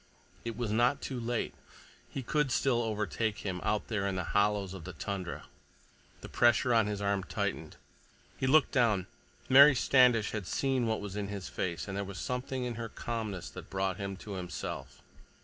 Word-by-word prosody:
It 115 -2 -5
was 120 -4 -2
not 120 +5 +3
too 130 -3 -4
late. 120 0 -2 0.6
He 135 - -5
could 150 +2 +1
still 120 -1 +2
overtake 110 -1 -2
him, 90 -2 -2
out 105 -1 0
there 105 -3 -1
in 95 - -1
the 90 - -1
hollows 100 -2 +2
of 95 -3 -8
the 90 +2 -7
tundra— 95 +3 -5 0.8
The - - -8
pressure 120 +1 +3
on 110 -2 +4
his 105 -1 -3
arm 100 -1 +1
tightened. - - -3 0.6
He 130 - -1
looked 150 +1 +5
down. 110 -7 +2 0.4
Mary 140 +2 +9
Standish 125 -3 +4
had 105 -4 -4
seen 130 -3 0
what 110 -2 0
was 100 -1 -6
in 105 -1 -2
his 100 -2 -5
face, 85 -5 -3
and 95 - -4
there 100 - -1
was 100 -1 -7
something 125 +1 -3
in 125 -1 -2
her 115 - -4
calmness 110 -5 -4
that - - -10
brought 95 -1 -1
him 100 -1 -4
to 105 - -9
himself. 90 -2 -6
105 Hz, 185 wpm, -31 LUFS, 100-120 Hz, 0.8 s, Mary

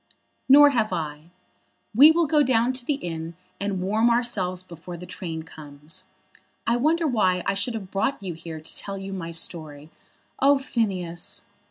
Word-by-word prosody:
"Nor 290 +2 +9
have 225 -5 0
I. 155 0 -4 0.6
We 275 +8 +9
will 335 +1 +3
go 300 0 +3
down 250 -2 +2
to 255 -1 -3
the 295 - +1
inn 165 - -6 0.2
and 200 -2 -2
warm 215 +5 +2
ourselves 205 -7 0
before 175 0 -9
the 180 - -9
train 165 -3 -6
comes. 155 +3 -11 0.6
I 230 - +2
wonder 315 +7 +2
why 185 - +2
I 195 - +1
should 200 +4 -2
have 195 -4 -7
brought 200 +3 -1
you 185 -3 -4
here 165 0 -8
to 155 - -10
tell 195 -1 -5
you 195 0 -6
my 175 -3 -5
story. 155 -2 -3 0.5
Oh, 280 +1 +5
Phineas." 195 - -3
195 Hz, 170 wpm, -25 LUFS, 165-240 Hz, 0.6 s, Nor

